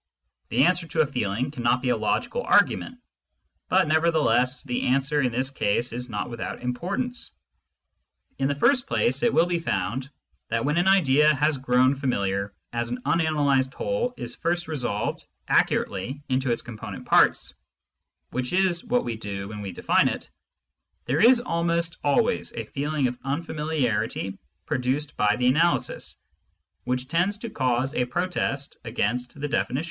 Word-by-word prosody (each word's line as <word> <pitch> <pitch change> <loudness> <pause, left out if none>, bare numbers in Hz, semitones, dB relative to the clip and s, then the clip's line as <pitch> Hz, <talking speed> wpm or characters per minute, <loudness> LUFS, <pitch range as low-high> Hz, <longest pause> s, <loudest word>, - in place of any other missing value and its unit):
The 125 +3 +3
answer 180 -1 +1
to 160 0 +1
a - - +3
feeling 125 -1 -2
cannot 125 -2 0
be 130 - +1
a - - +3
logical 485 - -1
argument, 255 - +2 0.7
but 185 -2 +4
nevertheless 155 -5 +2
the 125 -4 -2
answer 140 +3 +2
in 125 -2 +1
this 130 +3 -1
case 120 -1 0
is 125 +1 -5
not 105 -2 -3
without 120 0 -6
importance. 195 - -3 1.1
In 135 - +2
the 140 - 0
first 260 - +3
place, 235 - +1
it 240 - +3
will 165 - +4
be 175 -1 -1
found 125 - -2 0.4
that 115 +1 -1
when 150 +3 +1
an 175 +2 +2
idea 150 -7 +5
which 155 -2 +4
has 150 +1 +2
grown 130 0 +3
familiar 100 -8 -1 0.2
as 120 0 -2
an 125 +1 -3
unanalysed 145 -4 +2
whole 250 0 -1
is - - -3
first 175 0 -1
resolved 125 -9 -2 0.2
accurately 125 +9 0
into 130 -1 +1
its 115 - -1
component 115 -3 -8
parts - - +3 0.4
— - - -55
which 125 +3 -2
is 185 -2 +2
what 245 0 0
we 115 -2 -3
do 100 -2 -5
when 105 -1 -7
we 100 -2 -5
define 85 - +2
it - - -4 0.4
— - - -51
there 140 +5 0
is 240 +4 +7
almost 170 -6 -1
always 145 -1 +1
a - - -5
feeling 145 0 -2
of 125 0 -2
unfamiliarity 135 - -2 0.3
produced 135 +4 -1
by 105 0 +2
the 125 - -1
analysis, 160 +7 +1 0.7
which 125 +1 -1
tends 175 +7 +1
to 230 +1 -7
cause 130 +2 0
a 125 - +1
protest 140 -2 -2
against 125 +2 -2
the 145 - -2
definition. 135 -3 -1
135 Hz, 165 wpm, -25 LUFS, 125-165 Hz, 1.1 s, is